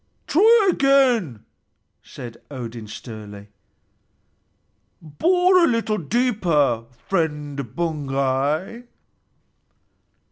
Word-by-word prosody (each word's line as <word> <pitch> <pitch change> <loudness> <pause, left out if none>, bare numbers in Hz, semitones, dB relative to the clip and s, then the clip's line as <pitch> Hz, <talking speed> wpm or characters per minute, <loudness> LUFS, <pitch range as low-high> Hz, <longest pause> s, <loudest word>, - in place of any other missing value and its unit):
"Try 425 +4 +4
again," 250 - +2 0.6
said 120 -2 -10
Odin 120 -5 -7
sternly. 105 -2 -10 1.5
"Bore 360 - +2
a - - +5
little 230 -3 0
deeper, 170 - 0 0.2
friend 150 - -3
Baugi." 150 - -2
155 Hz, 65 wpm, -22 LUFS, -, 1.5 s, a